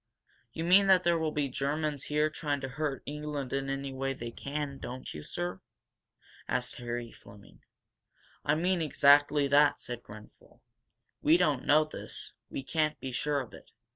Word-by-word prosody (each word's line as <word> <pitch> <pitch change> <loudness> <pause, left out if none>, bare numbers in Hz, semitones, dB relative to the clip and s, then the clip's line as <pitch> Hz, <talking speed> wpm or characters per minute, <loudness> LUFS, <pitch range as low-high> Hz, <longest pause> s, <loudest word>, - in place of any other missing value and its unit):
"You 160 - -4
mean 190 +3 +6
that 185 -2 +6
there 170 -1 +3
will 160 -1 0
be 150 -2 0
Germans 145 +2 -2
here 150 +1 +1
trying 145 -2 -2
to 135 - -4
hurt 140 +1 -3
England 150 -2 -4
any 135 0 -2
way 135 +1 -2
they 120 -2 -6
can, 140 +1 -4
don't 125 +1 -7
you 75 - -7
sir? 90 +4 -4 0.9
asked - - -1
Harry 120 -1 -4
Fleming. 100 0 -16 0.8
"I 150 - +2
mean 180 +2 +1
exactly 145 -1 +5
that," 145 0 +5
said 120 -1 -5
Grenfel. 105 -1 -15 0.6
"We 155 +3 +5
don't 150 -7 +1
know 155 +1 +6
this 155 - -7 0.2
we 135 - -5
can't 155 +1 0
be 130 - -5
sure 145 +3 0
of 125 - -10
it. - - -13
145 Hz, 165 wpm, -30 LUFS, 130-155 Hz, 0.9 s, mean